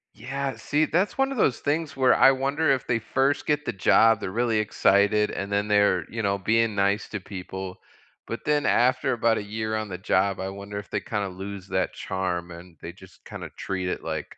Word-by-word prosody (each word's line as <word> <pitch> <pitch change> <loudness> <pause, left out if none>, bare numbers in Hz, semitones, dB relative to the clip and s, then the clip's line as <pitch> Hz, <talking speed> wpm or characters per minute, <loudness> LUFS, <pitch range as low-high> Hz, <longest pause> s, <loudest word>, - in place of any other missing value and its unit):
Yeah, 135 +5 -4
see? 150 +2 +1
That's 180 - 0
one 270 0 +2
of 270 - -4
those 135 - +2
things 145 0 -2
where 130 -1 +5
I 135 - +7
wonder 140 +4 0
if 130 - 0
they 120 -2 0
1st 135 +5 0
get 150 0 +1
the 120 - -2
job, 110 +3 +4
they're - - -4
really 115 +1 +1
excited, 105 0 +3
and 100 +1 -5
then 100 +1 0
they're, 100 -4 +3
you 115 0 -4
know, 100 -1 +1
being 115 +2 +1
nice 100 +2 +1
to 105 - -4
people, 95 -1 -7 0.5
but 115 - -6
then 150 -1 +1
after 130 +2 +2
about 115 -1 +2
a - - -5
year 110 +1 -3
on 110 -1 -3
the 90 - -5
job, 95 +1 +1
I 95 +1 -3
wonder 100 +1 -7
if 100 - -7
they - - 0
kinda 105 -4 -3
lose 95 +1 -8
that 95 - -1
charm, 90 -2 -3
and 85 0 -12
they 85 - -6
just 95 -1 -18
kinda - - -8
treat 95 -1 -3
it, - - -4
like, 80 -2 -5
105 Hz, 215 wpm, -25 LUFS, 95-130 Hz, 0.5 s, I